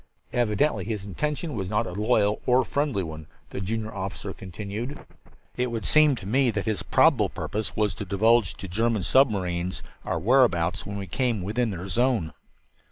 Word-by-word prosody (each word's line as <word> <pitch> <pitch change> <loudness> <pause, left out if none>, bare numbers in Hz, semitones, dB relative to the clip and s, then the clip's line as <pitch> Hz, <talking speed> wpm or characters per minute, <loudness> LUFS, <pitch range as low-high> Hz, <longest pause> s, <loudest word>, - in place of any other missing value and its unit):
"Evidently 115 -1 +1
his 105 -2 -4
intention 150 - -3
was 95 -4 -3
not 105 +2 +1
a 90 - -6
loyal 105 0 +1
or 125 0 +4
friendly 140 -9 0
one," 80 -2 -8 0.2
the - - -4
junior 110 +2 -3
officer 95 0 -5
continued. 105 - -6 0.6
"It 125 0 0
would 115 -2 -4
seem 155 -2 +5
to 105 - -9
me 130 +5 +2
that 105 -3 -2
his 110 -3 -1
probable - - +4
purpose 110 0 -4
was 105 -2 +1
to 100 - -6
divulge 110 +2 +3
to 95 - -8
German 110 +2 0
submarines 95 -9 +1 0.2
our - - -2
whereabouts 100 -9 +2
when 100 0 -5
we 100 - -4
came 115 +1 -1
within 110 +5 0
their 95 -3 -5
zone." 115 -4 +1
105 Hz, 170 wpm, -26 LUFS, 95-120 Hz, 0.6 s, seem